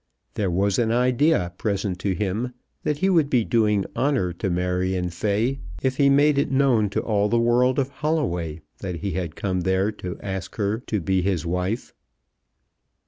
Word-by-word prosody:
There 100 -3 -1
was 95 +4 +1
an 115 -2 +2
idea 125 - +2
present 100 -3 -1
to 95 -1 -1
him 105 +6 -2 0.3
that 150 - -1
he 190 +5 +1
would 160 -6 +3
be 120 -5 +2
doing 105 -4 +2
honour 130 -11 +1
to 90 +3 -3
Marion 90 0 -1
Fay 105 +9 0 0.2
if 130 0 0
he 140 -1 +5
made 145 +1 +4
it - - +1
known 130 -6 +3
to - - -1
all 105 -2 +1
the 120 - +2
world 120 +3 +3
of 135 -1 +1
Holloway 90 - -2 0.2
that 90 -4 -5
he 100 - -2
had 85 -2 -3
come 95 -2 -1
there 95 +3 +1
to 90 -4 -7
ask 95 -2 -5
her 105 +1 0
to 105 - 0
be 95 +2 +1
his 90 -3 -1
wife. 90 +6 -2
105 Hz, 180 wpm, -24 LUFS, 90-125 Hz, 0.3 s, he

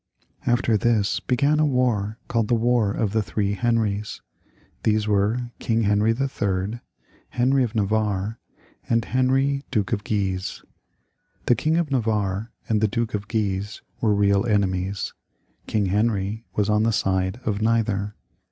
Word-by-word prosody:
After 120 -2 +3
this 105 -4 +1
began 140 - +1
a 155 - +4
war 115 -6 0
called 115 -3 0
the 120 - +3
War 115 -2 +2
of 105 0 -1
the 110 +1 +1
Three 100 -1 -1
Henries. 105 -1 0 0.6
These 110 -1 +1
were 105 +4 +1
King 115 -2 +1
Henry 105 +1 +3
III., 110 -4 -1 0.6
Heniy 130 +2 +3
of 115 -1 -3
Navarre, 105 0 0 0.5
and 115 -1 +2
Heniy, 135 +3 +1
Duke 105 -7 0
of 100 - -1
Guise. 95 -3 -2 0.8
The - - +5
King 155 +8 +1
of 170 -4 0
Navarre 110 -3 0 0.2
and 110 -2 +1
the 110 - +4
Duke 115 +2 -2
of 100 -1 -3
Guise 105 -2 -2 0.2
were 105 -2 +3
real 100 -1 +3
enemies. 100 -2 0 0.5
King 105 -2 +1
Henry 105 +2 0
was 105 -1 +1
on 105 0 +3
the 115 +1 +2
side 95 +2 0
of 105 -1 -1
neither. 110 -2 0
110 Hz, 145 wpm, -24 LUFS, 100-120 Hz, 0.8 s, The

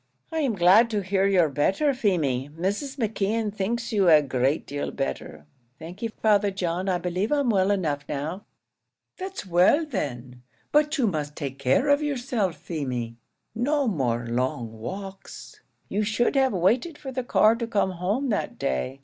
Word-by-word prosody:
"I 320 - -1
am 270 -8 0
glad 195 +6 +6
to 210 -3 -1
hear 195 +1 +1
you're 185 -4 +4
better, 190 - +1
Feemy. 155 - 0
Mrs. 205 - -2
McKeon 220 -2 -1
thinks 230 +4 -2
you 195 -4 +4
a 155 -2 +7
great 135 +2 0
deal 145 +1 -4
better." 75 +3 -5 0.3
"Thank 170 +5 -10
ye, 230 - 0 0.2
Father 205 -2 +4
John; 185 -1 -2
I 180 - +2
believe 180 +5 -2
I'm 285 -5 +2
well 190 -2 +2
enough 155 -8 -1
now." 155 +8 -4 0.8
"That's 380 - -6
well, 185 - +4
then; 125 - -5 0.3
but 300 +1 +3
you 260 - +2
must 150 -7 -2
take 135 -2 -5
care 135 - +2
of 285 +1 +4
yourself, 245 - -1
Feemy; 125 -8 -4 0.4
no 280 +4 0
more 120 - 0
long 120 -1 -2
walks; 190 - -8 0.3
you 210 - -1
should 220 +5 +1
have 265 -1 +3
waited 235 - +1
for 270 -3 -7
the 255 -1 -3
car 220 -2 +4
to 235 -1 -3
come 205 -4 +1
home 200 +10 -1
that 205 - -2
day. 65 - -2
195 Hz, 165 wpm, -25 LUFS, 145-235 Hz, 0.8 s, a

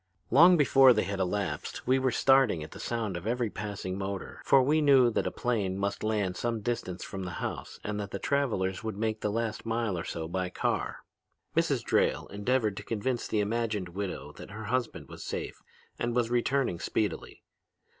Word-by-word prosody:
Long 170 +8 +8
before 135 -3 +7
they - - +1
had 100 -1 -3
elapsed 95 +1 -2
we 130 +2 +3
were 130 0 +2
starting 135 - +4
at 75 - -10
the - - -10
sound 110 -5 -2
of 85 +4 -5
every 120 -2 0
passing 100 -3 -5
motor, 95 -1 -5
for 135 -1 +5
we 155 +4 +3
knew 135 -5 +6
that - - 0
a - - -1
plane 105 -6 -1
must 100 0 -2
land 105 -4 0
some 115 +2 -2
distance 100 -5 -3
from 95 - -6
the 90 -2 -5
house - - -5
and 105 0 -3
that 100 -1 -4
the 100 - -4
travelers 110 -7 0
would 110 -3 -4
make 110 0 -1
the 105 - 0
last 110 0 -2
mile 115 -3 -1
or - - -4
so 80 -1 -4
by 90 +2 -2
car. - - -2 0.5
"Mrs. - - +2
Drayle - - +1
endeavored 105 0 0
to - - -5
convince 120 +2 -2
the 105 - +1
imagined 105 -3 -1
widow 95 -5 -5
that - - -10
her 105 +2 -7
husband 110 - -2
was - - -9
safe - - -5 0.4
and 120 0 -1
was 120 -1 +1
returning 125 -6 +1
speedily. - - -2
110 Hz, 195 wpm, -29 LUFS, 95-125 Hz, 0.5 s, Long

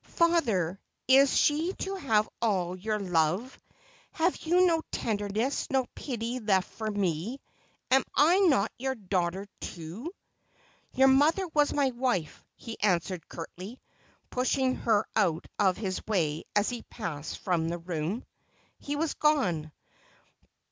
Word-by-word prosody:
' - - -45
Father, 225 - +1 0.3
is 270 +1 +6
she 315 +5 +2
to 390 - -3
have 225 - +1
all 185 -6 0
your 210 +3 -2
love? 180 +5 0 0.6
Have 335 +3 +1
you 355 +3 +3
no 330 -2 +3
tenderness, 215 +4 -1
no 265 -2 +1
pity 245 -1 -4
left 195 -5 +1
for 220 -1 -4
me? 200 - -2 0.5
Am 265 0 +5
I 335 +6 +5
not 280 - +3
your 265 +1 -1
daugh 185 -5 0
ter 190 +3 -7
too 180 - -7 0.3
?' - - -35
' - - -38
Your 265 +1 +6
mother 300 +8 +4
was 295 -2 +2
my 280 -2 +2
wife,' 240 - -2
he 230 -2 -9
answered 180 -3 0
curtly, 185 +8 -8 0.5
pushing 255 +1 +1
her 220 -5 +1
out 170 -7 +1
of 190 -3 +3
his 190 -3 -3
way 165 -7 0
as 205 0 +3
he 240 -2 -5
passed 160 -9 -5
from 170 -4 0
the 170 - -2
room. 170 +5 -3 0.5
He 290 - -4
was 320 +1 -1
gone. 185 - +1
220 Hz, 145 wpm, -29 LUFS, 180-270 Hz, 0.6 s, is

